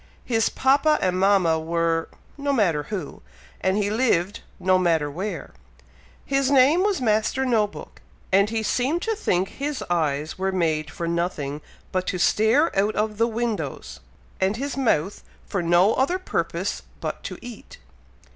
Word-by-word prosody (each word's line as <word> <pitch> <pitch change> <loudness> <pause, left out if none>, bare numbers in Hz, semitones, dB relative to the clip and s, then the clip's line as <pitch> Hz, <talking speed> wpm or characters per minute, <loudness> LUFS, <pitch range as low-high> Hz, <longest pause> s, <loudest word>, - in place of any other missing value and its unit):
His 225 -2 +1
papa 280 +3 +3
and 185 -1 0
mama 190 -5 +3
were 165 0 0 0.3
no 285 0 -1
matter 190 - +2
who, 205 -4 -5 0.4
and 190 +1 +1
he 205 -1 0
lived, 210 -5 +1 0.2
no 185 0 +3
matter 165 -5 +1
where. 190 +8 -5 0.7
His 275 -1 +1
name 280 +5 +5
was 400 -4 +1
Master 225 +2 +1
No 225 -5 +2
book, - - -12 0.3
and 200 +2 +4
he 225 0 -2
seemed 265 - 0
to 450 -1 0
think 190 - 0
his 285 0 -4
eyes 155 -1 -1
were 190 0 0
made 160 -4 0
for 170 - -5
nothing 165 -4 -2 0.3
but 185 0 -1
to 185 - -1
stare 220 - +3
out 205 +2 +1
of 215 0 -1
the 230 - +4
windows, 200 - -3 0.4
and 190 +3 +1
his 280 +3 -3
mouth 205 - 0 0.2
for 195 - -2
no 175 +5 +4
other 280 +8 +1
purpose 370 - -2 0.2
but - - -4
to - - -5
eat. 240 -3 -11
205 Hz, 155 wpm, -24 LUFS, 170-255 Hz, 0.7 s, name